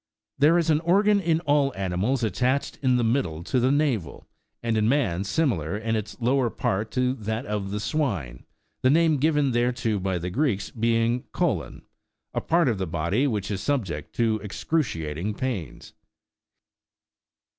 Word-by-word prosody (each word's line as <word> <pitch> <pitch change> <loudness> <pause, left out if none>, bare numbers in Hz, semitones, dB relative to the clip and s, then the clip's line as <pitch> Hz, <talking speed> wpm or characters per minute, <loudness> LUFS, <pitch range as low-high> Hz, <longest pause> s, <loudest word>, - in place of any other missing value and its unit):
There 155 +4 +5
is 165 -2 +2
an 150 - +3
organ 200 +5 +3
in 165 -3 +1
all 145 -3 +2
animals 95 +7 -1
attached 125 +6 0
in 130 -2 +3
the 120 - +1
middle 110 - 0
to 130 - 0
the 130 +2 +3
navel, 135 - -1 0.4
and 115 -1 0
in 110 0 +2
man 110 -10 +1
similar 100 - 0
in 110 +1 -1
its 105 +1 -5
lower 125 +1 +2
part 105 0 -2
to 125 0 +1
that 110 0 -4
of 105 -2 -3
the 105 +1 -3
swine, 105 - -2 0.4
the 130 - +4
name 160 +1 +4
given 145 -1 +2
thereto 120 -3 0
by 95 -1 -1
the 90 +1 -4
Greeks 110 -4 0
being 115 +1 +1
" - - -50
colon," - - -1 0.5
a - - -1
part 170 -1 +2
of 110 -6 0
the 95 - -2
body 85 - 0
which 105 -5 -2
is 95 -2 -2
subject 95 - -2
to 110 -2 +1
excruciating 100 - -2
pains. 120 - -5
115 Hz, 165 wpm, -25 LUFS, 100-140 Hz, 0.5 s, There